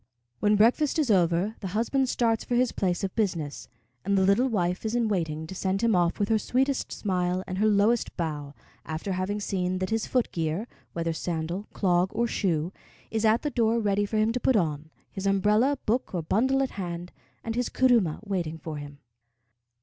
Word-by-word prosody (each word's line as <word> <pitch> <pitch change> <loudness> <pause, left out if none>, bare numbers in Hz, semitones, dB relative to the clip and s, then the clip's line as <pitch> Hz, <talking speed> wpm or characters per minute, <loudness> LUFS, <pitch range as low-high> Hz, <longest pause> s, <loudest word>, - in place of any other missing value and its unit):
When 210 0 +3
breakfast 245 +9 +3
is 290 -7 +2
over, 180 +3 +2
the 195 0 -4
husband 260 +3 +1
starts 230 -3 +1
for 245 - -2
his 250 0 +3
place 180 -2 -1
of 190 - -2
business, 170 -9 -2 0.4
and 200 0 +1
the 190 - +4
little 200 +7 +4
wife 180 -6 -1
is 220 +1 -2
in 235 -2 +2
waiting 160 -5 -1
to 160 - -8
send 190 +3 -1
him 230 -3 +3
off 175 -1 +2
with 205 - 0
her 220 -1 +3
sweetest 265 +4 0
smile 180 -2 -1
and 185 0 -4
her 215 - +3
lowest 215 +3 +2
bow, 150 -4 -4 0.3
after 160 +5 -4
having 185 +3 -1
seen 185 -2 -1
that 185 +3 -3
his 225 0 0
foot 250 -2 0
gear 165 +6 -2 0.3
whether 165 -1 -1
sandal, 170 +4 -3
clog, 180 -1 +2
or 235 +2 +2
shoe 180 -6 -1 0.4
is 225 0 0
at 220 +2 +3
the 295 - -1
door 230 -2 +2
ready 205 -1 +1
for 215 - -2
him 215 +1 +3
to 250 - -1
put 255 +1 +2
on, 155 -5 0 0.2
his 195 0 -3
umbrella, 210 +8 +3
book, 230 -3 0
or 170 - -1
bundle 260 +10 +2
at 265 - -3
hand, 175 -2 -5 0.3
and 225 - -3
his 245 +1 -1
kuruma 235 -11 +2
waiting 175 -6 -2
for 160 -1 -6
him. 145 0 -8
200 Hz, 200 wpm, -27 LUFS, 175-225 Hz, 0.4 s, the